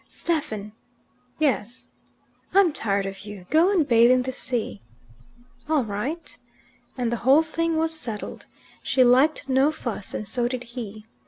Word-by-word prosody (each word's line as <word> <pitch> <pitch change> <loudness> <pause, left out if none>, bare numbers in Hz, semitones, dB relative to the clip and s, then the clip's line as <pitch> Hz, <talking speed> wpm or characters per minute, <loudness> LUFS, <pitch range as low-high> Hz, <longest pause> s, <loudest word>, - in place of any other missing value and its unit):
"Stephen!" 220 -11 -3 0.7
"Yes." 255 -6 0 0.7
"I'm 385 -5 +5
tired 200 -6 -1
of 195 0 -6
you. 205 -2 -10
Go 330 +5 +5
and 340 -8 +2
bathe 235 -2 +6
in 255 0 +4
the 260 - -3
sea." 235 - -3 0.9
"All 305 -4 +3
right." 235 +11 -4 0.6
And 240 -2 -1
the 235 - 0
whole 270 +7 +5
thing 325 +1 -1
was 320 0 +1
settled. 235 -9 -6 0.3
She 260 - +3
liked 270 +4 +4
no 265 +3 +3
fuss, 240 -10 -5
and 215 - -4
so 240 +3 0
did 250 0 -4
he. 225 -3 -8
250 Hz, 150 wpm, -24 LUFS, 215-310 Hz, 0.9 s, bathe